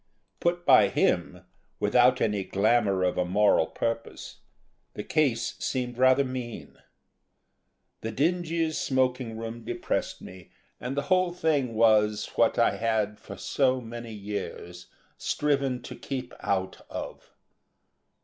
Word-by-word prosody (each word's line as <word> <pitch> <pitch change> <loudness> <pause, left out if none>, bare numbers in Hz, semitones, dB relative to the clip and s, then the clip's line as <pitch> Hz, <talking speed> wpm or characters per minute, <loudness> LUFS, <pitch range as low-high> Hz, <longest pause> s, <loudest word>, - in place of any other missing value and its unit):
Put 175 0 0
by 130 -7 +7
him, - - 0 0.4
without 125 +4 +4
any 105 -3 +1
glamour 100 -1 +2
of 90 - 0
a - - +3
moral 95 -2 +3
purpose, 115 0 -4 0.6
the 105 - -4
case 125 -6 +1
seemed 125 -2 -2
rather 130 +1 +5
mean. 125 -3 -6 1.2
The 110 - -4
dingy 165 +2 0
smoking 130 -5 0
room 115 +1 -6
depressed - - -3
me 90 -1 -12 0.3
and 130 +3 -5
the 140 - +1
whole 185 0 +2
thing 150 -9 0
was, 110 -2 +3
what - - +2
I - - +3
had, 110 -2 0
for 100 - -10
so 130 +7 +1
many 115 -1 -8
years, 100 -4 -6 0.3
striven 140 -4 0
to - - -8
keep 130 -3 -6
out 95 -1 -2
of. - - -7
120 Hz, 125 wpm, -27 LUFS, 105-135 Hz, 1.2 s, by